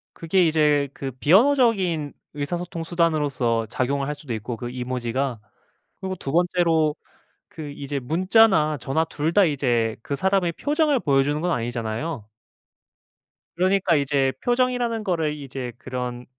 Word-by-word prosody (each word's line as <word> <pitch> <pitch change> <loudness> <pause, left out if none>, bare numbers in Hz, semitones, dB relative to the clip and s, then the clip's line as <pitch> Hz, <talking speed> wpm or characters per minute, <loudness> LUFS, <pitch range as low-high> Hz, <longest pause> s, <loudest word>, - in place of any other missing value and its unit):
그게 175 +2 +2
이제 150 -3 +2
그 135 - -5
비언어적인 185 - +3 0.2
의사소통 165 +3 -4
수단으로써 145 -9 0
작용을 135 +3 -1
할 150 - -2
수도 145 -5 -6
있고 115 +2 -5
그 120 +2 -6
이모지가. 125 0 -3 0.6
그리고 190 -1 -3
2 135 -5 -5
번째로 165 -3 +2 0.5
그 160 -7 -8
이제 145 0 -4
문자나 165 - +3
전화 135 +6 0
2 160 0 -2
다 200 +2 +5
이제 120 -8 0
그 140 - -3
사람의 190 +1 +1
표정을 295 - +1
보여 135 -6 +3
주는 145 +2 -1
건 175 +2 0
아니잖아요. 115 +1 -3 1.3
그러니까 185 0 +2
이제 140 -2 +1
표정이라는 245 -2 0
거를 165 -6 0
이제 135 -3 -6
그런 125 -1 -5
150 Hz, 305 characters per minute, -23 LUFS, 130-180 Hz, 1.3 s, 다